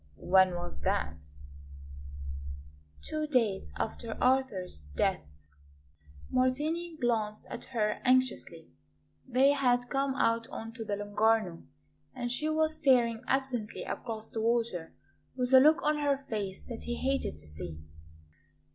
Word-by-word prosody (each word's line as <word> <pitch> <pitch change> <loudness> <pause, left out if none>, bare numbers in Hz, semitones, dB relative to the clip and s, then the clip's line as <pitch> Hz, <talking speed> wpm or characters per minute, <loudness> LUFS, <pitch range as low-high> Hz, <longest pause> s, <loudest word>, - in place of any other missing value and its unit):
"When 185 - +4
was 175 - -6
that?" 75 +1 -1 1.8
"Two 310 -1 -2
days 230 -9 +1
after 225 0 -4
Arthur's 255 - +1 0.2
death." - - +1 1.1
Martini 305 +7 0
glanced 220 -3 0
at - - -5
her 215 -4 -1
anxiously. 255 0 +1 0.6
They 265 +2 +5
had 245 -3 +2
come 275 -1 0
out 230 -2 +1
on 225 0 -7
to 230 -1 -6
the 210 -2 -2
Lung'Arno, 205 -3 +1 0.5
and 245 -1 -2
she 300 +5 +2
was 315 0 +1
staring 235 -4 +3
absently 260 -5 -1
across 220 -1 -4
the 225 - -3
water, 230 -7 0 0.4
with 250 0 0
a 260 - +11
look 310 +5 +5
on 300 0 +2
her 280 -2 0
face 200 -5 -4
that 235 -2 -7
he 240 - -2
hated 270 - -1
to 75 - -10
see. 75 +1 -7
240 Hz, 130 wpm, -30 LUFS, 210-265 Hz, 1.8 s, a